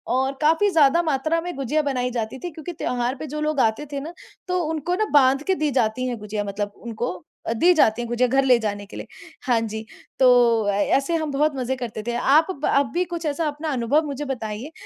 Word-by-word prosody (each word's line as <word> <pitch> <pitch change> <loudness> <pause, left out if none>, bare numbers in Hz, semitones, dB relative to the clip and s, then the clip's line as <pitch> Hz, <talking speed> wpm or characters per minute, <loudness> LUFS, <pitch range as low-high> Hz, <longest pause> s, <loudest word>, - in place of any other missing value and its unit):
और 265 +1 +1
काफ़ी 325 +7 +3
ज़्यादा 320 -1 +4
मात्रा 310 +2 0
में 355 -2 -5
गुजिया 275 +3 0
बनाई 255 -3 -1
जाती 230 +1 -3
थी, 350 - -6
क्योंकि 320 +3 -7
त्योहार 250 -4 -2
पे - - -5
जो 300 +2 -5
लोग 305 -2 0
आते 225 +6 +1
थे 280 - -2
ना, 320 +5 -7 0.3
तो 365 0 0
उनको 320 +3 -2
ना 430 +2 +1
बांध 275 0 +5
के 380 - +3
दी 305 -3 0
जाती 230 +3 +1
हैं 240 -2 -3
गुजिया 210 0 -4
मतलब 205 0 -4
उनको 235 -2 -4 0.4
दी 355 +6 +5
जाती 240 -7 +3
हैं 235 - -4
गुजिया 245 +1 +2
घर 270 +2 +2
ले 250 -2 +6
जाने 205 -2 -3
के - - -11
लिए। - - -7 0.4
हाँ 240 -3 +3
जी, 220 0 -5 0.3
तो 240 -4 +5
ए 205 - +2
ऐसे 280 +5 -1
हम 315 -3 -2
बहुत 295 +1 +1
मज़े 260 0 -2
करते 235 -4 -6
थे। 240 - -1
आप 310 +8 +3
ब 300 -4 -5
आप 280 0 +3
भी 360 +1 +1
कुछ 340 -1 -6
ऐसा 305 +2 -1
अपना 300 +2 -4
अनुभव 255 +6 +1
मुझे 285 +1 -4
बताइए, 240 +1 -5
270 Hz, 230 wpm, -23 LUFS, 235-310 Hz, 0.4 s, ले